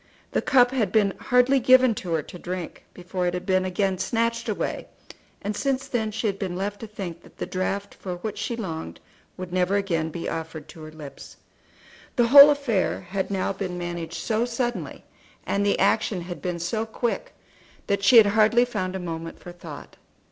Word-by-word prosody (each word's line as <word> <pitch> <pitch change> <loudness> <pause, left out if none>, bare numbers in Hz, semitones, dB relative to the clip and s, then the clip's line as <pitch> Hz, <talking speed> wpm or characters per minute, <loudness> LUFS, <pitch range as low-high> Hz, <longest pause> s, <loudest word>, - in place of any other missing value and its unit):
The - - +1
cup 250 -2 +4
had 225 -8 0
been 200 -2 +3
hardly 250 +2 +3
given 255 0 +6
to 175 -2 -3
her 160 -2 0
to 180 - -11
drink 180 -2 -6
before 180 0 -3
it 175 - -1
had 180 0 -5
been 185 -1 +2
again 185 0 0
snatched 230 0 -1
away, - - -3 0.6
and 205 +1 -2
since 270 +2 -1
then 220 -3 -1
she 220 +2 -4
had 200 -2 -1
been 185 -3 -3
left 200 +2 -3
to 225 - -7
think 185 -5 -7
that - - -19
the - - -3
draught 195 +2 -3
for 180 -2 -6
which 200 +4 -5
she 235 - -2
longed 160 - -6 0.4
would 180 -1 -7
never 185 +2 +2
again 170 -6 0
be 165 +1 -5
offered 160 -1 -5
to 160 - -12
her 155 0 -9
lips. 150 -3 -11 0.8
The 240 -2 +3
whole 280 +2 +11
affair 280 -10 0
had 190 +1 -3
now 195 0 -1
been 185 -2 -4
managed 175 -1 -5
so 220 0 0
suddenly, 240 0 -3 0.4
and 200 - 0
the 200 - +2
action 200 -1 +1
had 175 -3 -7
been 175 +1 -2
so 215 +7 -2
quick, 240 - -3 0.5
that 200 0 0
she 235 +4 +7
had 225 - +10
hardly 220 +3 +4
found 190 -6 -3
a - - -3
moment 165 -2 -6
for 175 - -10
thought. 170 -4 -11
195 Hz, 195 wpm, -25 LUFS, 175-225 Hz, 0.8 s, whole